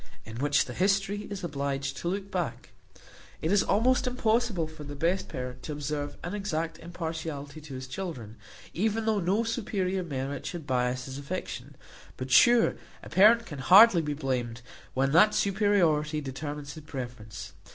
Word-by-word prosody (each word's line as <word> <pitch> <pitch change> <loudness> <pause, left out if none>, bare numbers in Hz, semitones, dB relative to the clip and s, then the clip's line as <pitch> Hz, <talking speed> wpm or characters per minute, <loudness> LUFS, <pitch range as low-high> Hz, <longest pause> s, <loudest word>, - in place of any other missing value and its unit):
In 110 +1 -8
which 145 +3 +2
the 125 - -7
history 195 - +1
is 200 -2 -6
obliged 140 -3 -2
to - - -4
look 195 +2 -3
back. 160 -11 -3 0.7
It 160 - -1
is 205 0 +5
almost 255 +4 +2
impossible 230 -7 +1
for 155 -1 -10
the 145 0 -7
best 175 +6 0
parent 125 -2 -6
to 150 - -5
observe 145 0 -4
an 175 - -4
exact 165 -6 -3
impartiality 160 -3 -5
to 145 -3 -9
his 130 0 -6
children, 130 - -6 0.4
even 220 +4 0
though 220 -2 +2
no 195 +5 +1
superior 200 -5 -1
merit 140 -3 -4
should 170 -4 -6
bias 125 -1 0
his 135 +1 -6
affection; 140 -3 -6 0.4
but 130 0 -5
sure 235 - +6 0.3
a - - -9
parent 225 +5 +6
can 150 -9 -8
hardly 190 - +8
be 150 -2 -3
blamed, 125 -5 -3 0.3
when 135 +1 +2
that 210 +7 +6
superiority 180 -7 +2
determines 145 +1 -6
his 155 - -10
preference. 120 -7 -7
160 Hz, 160 wpm, -28 LUFS, 135-195 Hz, 0.7 s, hardly